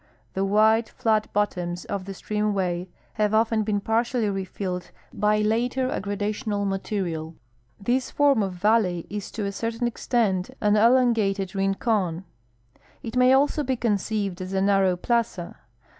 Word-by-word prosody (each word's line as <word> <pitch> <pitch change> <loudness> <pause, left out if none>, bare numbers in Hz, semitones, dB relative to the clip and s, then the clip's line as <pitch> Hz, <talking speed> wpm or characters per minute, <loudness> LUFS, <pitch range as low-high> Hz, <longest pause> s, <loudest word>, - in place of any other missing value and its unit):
The 190 - -1
wide, 220 +3 +3
flat 215 -2 0
bottoms 180 -4 -1
of 200 -2 -4
the 195 - -6
streaiUAvay 195 -4 -1 0.3
have 210 0 +2
often 225 0 +2
been 210 -1 0
partially 225 +1 0
refilled 185 -2 -4 0.2
by 210 0 +2
later 245 +4 0
aggrada 205 0 -2
tional 210 -2 -2
material. 180 -5 -3 0.4
This 250 +5 0
form 285 -5 +3
of 195 -2 -2
valley 180 -2 +1
is 205 -1 -5
to 210 -2 -3
a 200 - -2
certain 230 +3 -3
extent 220 -5 0
an 210 0 +3
elongated 215 -5 +3
rincon. 195 -3 0 0.8
It 225 - -6
ma_y 255 +1 +5
also 290 +2 +1
be 260 -2 0
conceived 205 -4 -1
as 185 +1 -5
a 190 - +1
narroAv 190 -2 +2
plaza. 230 -7 -1
210 Hz, 145 wpm, -25 LUFS, 195-230 Hz, 0.8 s, ma_y